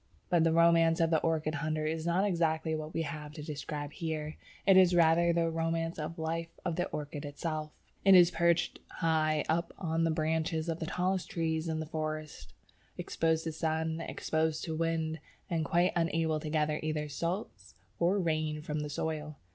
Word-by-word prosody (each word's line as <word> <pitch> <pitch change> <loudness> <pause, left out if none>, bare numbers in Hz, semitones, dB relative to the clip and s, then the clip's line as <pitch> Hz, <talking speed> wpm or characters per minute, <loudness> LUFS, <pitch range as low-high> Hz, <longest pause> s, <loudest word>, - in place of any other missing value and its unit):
But 170 -2 +4
the 165 - +3
romance 165 0 +5
of 165 0 +2
the 160 - +4
orchid 160 -1 0
hunter 155 -1 -1
is 160 +1 -2
not 180 +4 +2
exactly 165 -4 +1
what 155 0 -4
we 165 - -1
have 150 -2 -6
to 150 -1 -7
describe 150 -1 -5
here. 155 -2 -4 0.3
It 195 - +6
is 185 -1 +6
rather 170 0 +5
the 165 -1 +1
romance 165 0 -1
of 155 +2 -4
the 160 - -5
life 165 +1 -2 0.2
of 175 -3 0
the 175 - 0
orchid 145 0 -5
itself. 155 +1 -4 0.3
It 195 -1 +8
is 175 -1 +7
perched 170 0 +1
high 155 -2 +1
up 170 +2 0
on 165 -3 -1
the 165 - +2
branches 160 +1 0
of 165 0 -2
the 160 - -3
tallest 185 +1 -1
trees 160 -1 -1
in 160 -1 -1
the 160 - -3
forest, 155 - -5 0.5
exposed 160 0 0
to 160 - -2
sun, 160 0 -1
exposed 160 -1 -1
to 160 - -3
wind, 160 -1 -1 0.3
and 165 -2 +1
quite 175 +2 +2
unable 165 -2 +1
to 155 - -5
gather 150 0 +1
either 155 -1 -2
salts 145 - -4 0.2
or 175 +4 +3
rain 155 -4 -1
from 150 -1 -3
the 150 0 -3
soil. 155 0 -3
160 Hz, 185 wpm, -31 LUFS, 155-165 Hz, 0.5 s, It